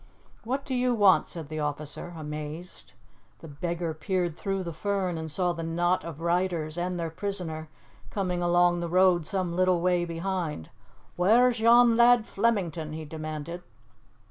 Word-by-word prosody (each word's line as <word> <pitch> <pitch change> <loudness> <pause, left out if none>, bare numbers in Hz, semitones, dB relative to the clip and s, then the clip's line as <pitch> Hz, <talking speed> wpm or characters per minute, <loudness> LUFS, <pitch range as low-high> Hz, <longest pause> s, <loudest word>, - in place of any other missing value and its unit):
"What 265 +4 -3
do 265 - -3
you 250 -1 +1
want?" 200 -4 +5
said 165 -4 -6
the 155 +1 -5
officer, 150 +3 -3
amazed. 155 +3 -7 0.4
The 165 - -12
beggar 170 +2 -3
peered 175 +1 -2
through 195 +1 -3
the 170 -2 -5
fern 190 0 -1
and 160 0 -5
saw 175 +3 +1
the 165 - -6
knot 175 +2 0
of 165 -2 -8
riders 170 -2 0
and 175 0 -2
their 165 -1 -3
prisoner 165 -4 -3 0.4
coming 180 -3 -2
along 175 0 +3
the 170 -1 -3
road 180 -2 +4
some 185 -3 -2
little 185 -1 +3
way 180 0 +2
behind. 170 - -4 0.5
"Whaur's 235 +6 +4
yon 235 +1 +6
lad 240 -1 +5
Flemington?" 175 -10 -1
he 160 0 -6
demanded. 155 +2 -6
175 Hz, 155 wpm, -27 LUFS, 160-190 Hz, 0.5 s, yon